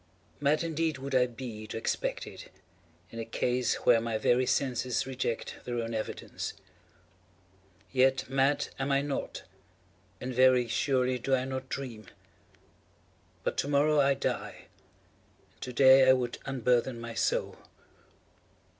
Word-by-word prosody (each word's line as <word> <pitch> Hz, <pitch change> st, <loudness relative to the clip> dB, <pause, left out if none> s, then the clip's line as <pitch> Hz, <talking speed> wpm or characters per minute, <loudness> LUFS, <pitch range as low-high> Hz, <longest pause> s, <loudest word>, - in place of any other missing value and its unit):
Mad 145 Hz, +3 st, +2 dB
indeed 160 Hz, -2 st, -1 dB
would 135 Hz, +1 st, -6 dB
I 125 Hz, -1 st, +4 dB
be 115 Hz, -3 st, -8 dB
to -, -, -5 dB
expect 110 Hz, -, -2 dB
it, -, -, -11 dB, 0.6 s
in 115 Hz, -, -7 dB
a -, -, -2 dB
case 125 Hz, +2 st, 0 dB
where 115 Hz, -2 st, +6 dB
my 115 Hz, -1 st, -1 dB
very 125 Hz, +3 st, +2 dB
senses 125 Hz, -2 st, 0 dB
reject 125 Hz, -3 st, -3 dB
their 120 Hz, -1 st, -4 dB
own 115 Hz, 0 st, -3 dB
evidence. 110 Hz, -1 st, -4 dB, 1.4 s
Yet, 130 Hz, 0 st, +3 dB
mad 135 Hz, +2 st, +1 dB
am 135 Hz, +1 st, -1 dB
I 140 Hz, 0 st, +2 dB
not—and 135 Hz, -2 st, -8 dB
very 125 Hz, -1 st, +5 dB
surely 130 Hz, 0 st, +1 dB
do 135 Hz, +2 st, +1 dB
I 130 Hz, 0 st, -1 dB
not 130 Hz, 0 st, -5 dB
dream. 115 Hz, -7 st, -6 dB, 1.4 s
But -, -, -2 dB
to -, -, 0 dB
morrow 145 Hz, +1 st, +3 dB
I 140 Hz, 0 st, +4 dB
die, 135 Hz, -, -4 dB, 0.8 s
and -, -, -32 dB
to 125 Hz, -, -5 dB
day 130 Hz, +1 st, +7 dB
I -, -, +9 dB
would 125 Hz, -2 st, -2 dB
unburthen 125 Hz, -2 st, +1 dB
my 115 Hz, 0 st, -6 dB
soul. -, -, -1 dB
130 Hz, 135 wpm, -29 LUFS, 120-135 Hz, 1.4 s, I